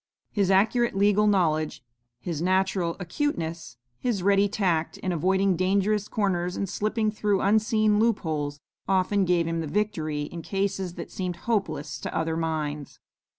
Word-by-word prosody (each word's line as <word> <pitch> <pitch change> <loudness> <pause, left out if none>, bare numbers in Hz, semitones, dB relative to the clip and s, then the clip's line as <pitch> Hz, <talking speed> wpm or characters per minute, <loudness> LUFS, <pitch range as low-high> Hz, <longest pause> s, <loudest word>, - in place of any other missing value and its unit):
His 200 -3 +1
accurate 220 +5 +3
legal 205 +1 +3
knowledge, 155 -8 +1 0.4
his 165 +1 -4
natural 185 -1 +1
acuteness, 170 - -3 0.2
his 225 -7 -1
ready 200 +1 +4
tact 180 -6 0
in 185 - -3
avoiding 190 +3 +2
dangerous 200 +3 +1
corners 180 -4 -1
and 195 - -1
slipping 215 +3 0
through 210 -2 0
unseen 215 0 +3
loop 225 -1 +2
holes, 145 -3 -3 0.3
often 195 +1 +2
gave 175 -2 +2
him 165 0 -2
the 160 - -3
victory 155 -6 -1
in 170 +3 -7
cases 195 -1 -2
that 170 - -7
seemed 180 -2 -3
hopeless 160 -10 -1
to - - -4
other 160 0 0
minds. 155 -3 -3
190 Hz, 150 wpm, -26 LUFS, 165-205 Hz, 0.4 s, ready